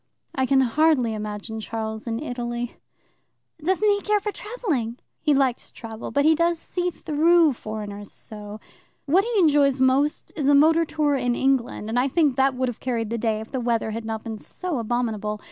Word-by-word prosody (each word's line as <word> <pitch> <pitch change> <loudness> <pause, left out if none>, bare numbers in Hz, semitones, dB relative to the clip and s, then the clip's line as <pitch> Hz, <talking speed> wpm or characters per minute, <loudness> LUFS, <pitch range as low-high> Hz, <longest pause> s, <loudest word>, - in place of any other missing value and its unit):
"I 265 -1 0
can 270 0 +4
hardly 260 -2 +3
imagine 215 +1 -5
Charles 220 0 -5
in 225 -1 -1
Italy." 240 -3 -4 0.9
"Doesn't 375 +5 +2
he 405 -1 +3
care 420 0 +2
for 420 +1 -3
travelling?" 335 - -3 0.2
"He 305 - +1
likes 265 -3 +1
travel, 225 -1 -8
but 285 0 +1
he 320 - +6
does 335 +1 +2
see 355 +2 -2
through 325 -1 +3
foreigners 210 -3 -7
so. 210 0 -9 0.5
What 345 +7 +4
he 470 - -3
enjoys 285 -5 +4
most 265 +3 +1
is 290 -4 -1
a 285 - +6
motor 320 +3 +5
tour 300 -2 0
in 245 -3 0
England, 260 -5 0
and 230 +3 0
I 255 - +2
think 290 -2 +2
that 265 0 +2
would 255 0 0
have 245 - -5
carried 230 -4 -2
the 235 - -1
day 220 -1 0
if 220 - -10
the 260 - -2
weather 230 -2 0
had 225 +1 -4
not 220 -1 -4
been 220 -2 -6
so 355 - -4
abominable. 220 -2 -2
255 Hz, 190 wpm, -24 LUFS, 225-310 Hz, 0.9 s, he